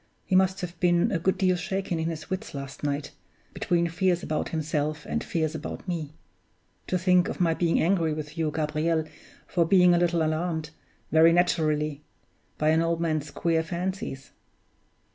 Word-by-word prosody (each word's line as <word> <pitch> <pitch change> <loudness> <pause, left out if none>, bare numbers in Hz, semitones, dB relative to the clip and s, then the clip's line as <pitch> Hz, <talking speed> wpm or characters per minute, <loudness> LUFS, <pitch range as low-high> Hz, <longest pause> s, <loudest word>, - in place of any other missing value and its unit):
He 190 - 0
must 190 +1 +3
have 175 -1 -6
been 175 -1 +3
a 185 - 0
good 190 +3 +1
deal 185 -1 +3
shaken 185 -1 -2
in 160 +1 -1
his 155 -2 -6
wits 190 -5 -5
last 140 0 -7
night, 145 0 -2 0.4
between 170 -1 +1
fears 175 +1 0
about 155 - -2
himself 155 -1 -2
and - - -2
fears 160 -2 -1
about 155 +4 -6
me. 160 -4 -4 0.7
(To 185 - +1
think 180 +2 +3
of - - -5
my 170 -2 +3
being 165 0 +1
angry 170 -2 +2
with 150 0 -5
you, 160 -2 0
Gabriel, 155 +1 0 0.4
for 175 - +1
being 180 +1 +5
a 175 - +3
little 170 -1 +2
alarmed 160 0 -1 0.4
very 160 +1 +6
naturally 155 -4 +1 0.6
by 155 - +2
an 160 +1 +4
old 165 0 0
man's 155 -3 -1
queer 165 +1 0
fancies!) 170 -4 -4
165 Hz, 170 wpm, -27 LUFS, 155-180 Hz, 0.7 s, very